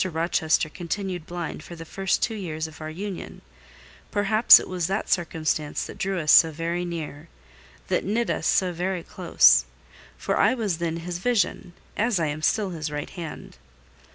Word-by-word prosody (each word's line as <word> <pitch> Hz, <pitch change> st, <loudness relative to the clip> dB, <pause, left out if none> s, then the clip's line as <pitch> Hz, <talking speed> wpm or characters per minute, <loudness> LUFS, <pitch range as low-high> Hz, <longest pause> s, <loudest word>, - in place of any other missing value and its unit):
Rochester 160 Hz, -2 st, 0 dB
continued 175 Hz, +1 st, -5 dB
blind 175 Hz, -1 st, -5 dB
the 165 Hz, -1 st, -10 dB
first 195 Hz, +3 st, -1 dB
two 225 Hz, -, 0 dB
years 165 Hz, -7 st, -4 dB
of 160 Hz, 0 st, -10 dB
our 155 Hz, -, -5 dB
union; 190 Hz, +3 st, -7 dB, 0.7 s
perhaps 215 Hz, +3 st, +7 dB
it -, -, -7 dB
was 180 Hz, -3 st, -2 dB
that 195 Hz, +3 st, -2 dB
circumstance 155 Hz, -3 st, -1 dB
that -, -, -10 dB
drew 190 Hz, -1 st, -1 dB
us 155 Hz, -2 st, +2 dB
so 165 Hz, -, +8 dB
very 165 Hz, +3 st, -3 dB
near—that 70 Hz, -, -6 dB
knit 230 Hz, +5 st, 0 dB
us -, -, -2 dB
so 185 Hz, -2 st, +2 dB
very 180 Hz, +1 st, -2 dB
close: -, -, +4 dB, 0.5 s
for -, -, -1 dB
I 215 Hz, +5 st, +4 dB
was 205 Hz, -9 st, -2 dB
then 165 Hz, -1 st, -2 dB
his 175 Hz, -1 st, -4 dB
vision, 200 Hz, -4 st, 0 dB, 0.2 s
as 225 Hz, -3 st, +1 dB
I 165 Hz, -, +1 dB
am 150 Hz, +1 st, -3 dB
still 200 Hz, +4 st, +1 dB
his 160 Hz, -3 st, -4 dB
right 150 Hz, 0 st, -5 dB
hand. 165 Hz, -, -8 dB
170 Hz, 165 wpm, -25 LUFS, 155-190 Hz, 0.7 s, so